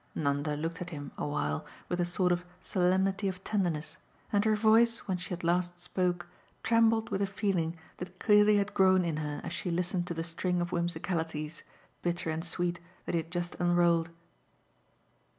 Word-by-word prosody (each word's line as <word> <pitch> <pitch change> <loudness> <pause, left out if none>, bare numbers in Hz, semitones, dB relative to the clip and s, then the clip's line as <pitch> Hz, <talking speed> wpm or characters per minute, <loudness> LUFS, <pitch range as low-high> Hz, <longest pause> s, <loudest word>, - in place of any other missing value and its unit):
Nanda 145 0 0
looked 165 +3 -4
at 180 - -4
him 145 -4 -7
a - - -3
while 75 - -1 0.2
with 175 - -2
a 175 - +2
sort 180 +1 +1
of 175 0 +1 0.2
solemnity 190 +2 +1
of 185 0 -4
tenderness, 175 -7 -1 0.4
and 205 0 +4
her 215 -1 +4
voice, 225 +2 +4
when 185 -2 -1
she 180 - -7
at 180 0 -4
last 175 +1 +1
spoke, 180 0 -1 0.4
trembled 225 -1 +3
with 195 - 0
a 200 - +2
feeling 185 -5 -1 0.2
that 180 +1 -8
clearly 210 0 +5
had 200 0 0
grown 190 -2 +5
in 160 -3 -1
her 150 -1 -3
as - - -5
she 180 - -3
listened 175 +1 0
to 170 - -3
the 165 - -2
string 175 +2 -1
of 175 0 -2
whimsicalities, 165 -2 -2 0.4
bitter 175 -2 -1
and 160 +1 -3
sweet, 175 0 -2 0.3
that - - -3
he 170 - +2
had 165 - -14
just 175 0 -3
unrolled. 175 -1 +3
175 Hz, 185 wpm, -31 LUFS, 165-190 Hz, 0.4 s, clearly